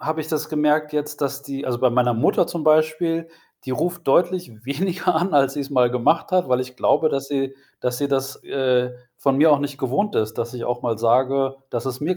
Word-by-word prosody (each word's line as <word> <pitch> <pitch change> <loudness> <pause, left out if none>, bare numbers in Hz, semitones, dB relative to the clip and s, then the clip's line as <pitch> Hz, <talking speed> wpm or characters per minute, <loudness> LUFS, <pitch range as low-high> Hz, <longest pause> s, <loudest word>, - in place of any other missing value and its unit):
ja, - - -8
habe 160 0 -1
ich 155 - -5
das 155 -2 -2
gemerkt 150 0 +1
jetzt, 150 0 -3
dass 140 0 -2
die 140 0 -6
also, 120 -2 -2
bei 130 -1 +3
meiner 120 0 +2
Mutter, 115 - +2
zum 165 -3 -4
Beispiel, 155 +2 +2 0.4
die 130 - -5
ruft 170 +6 -2
deutlich 175 +3 +2 0.2
weniger 180 +4 -1
an, 175 +3 0
als 135 -1 +3
sie's 140 -1 -4
mal 125 -3 +3
gemacht 160 +9 +1
hat, 180 -7 +2
weil 125 0 +3
ich 125 0 -6
glaube, 155 - +3
dass 135 -1 -3
sie 135 -1 -2 0.3
dass 125 0 -2
sie 140 -1 -1
das, 135 -1 -2
äh, 125 -2 0 0.3
von 135 -1 +1
mir 155 +1 +6
auch 140 - +3
nicht 145 -1 -4
gewohnt 140 +11 -1
ist, 110 0 -1
dass 115 +2 -3
ich 120 - -5
auch 120 0 -3
mal 115 -3 -1
sage, 135 +3 +2 0.2
das 120 +2 -3
es 130 0 -4
mir 175 +5 -1
140 Hz, 230 wpm, -22 LUFS, 125-155 Hz, 0.4 s, mir